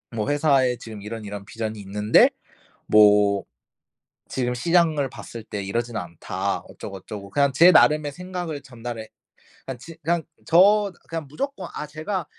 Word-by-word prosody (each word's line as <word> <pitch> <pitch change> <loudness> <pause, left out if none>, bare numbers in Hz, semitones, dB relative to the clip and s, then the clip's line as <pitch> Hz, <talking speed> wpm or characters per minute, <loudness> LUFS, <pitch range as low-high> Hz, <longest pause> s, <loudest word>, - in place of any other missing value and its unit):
뭐 105 +2 -1
회사에 140 -4 +3
지금 110 -4 -9
이런, 110 +1 -7
이런 100 -1 -6
비전이 110 0 -5
있는데 105 +2 +4 0.6
뭐 105 -1 +5 0.8
지금 125 -1 -1
시장을 160 -1 +2
봤을 115 -4 -9
때 105 -2 -5
이러진 115 +4 -3
않다." 85 -5 -3
어쩌고, 95 - -8
어쩌고 100 +1 -9
그냥 140 +6 +2
제 170 +7 +7
나름의 150 -1 +5
생각을 175 -3 -5
전달해 120 -4 -7 0.6
그냥 135 -2 -5
지 165 +4 -11
그냥 165 +1 +1 0.2
저 200 +4 +5 0.2
그냥 165 -3 -5
무조건 195 - -4
"아 150 - -5
제가 160 +6 -4
130 Hz, 300 characters per minute, -24 LUFS, 105-160 Hz, 0.8 s, 제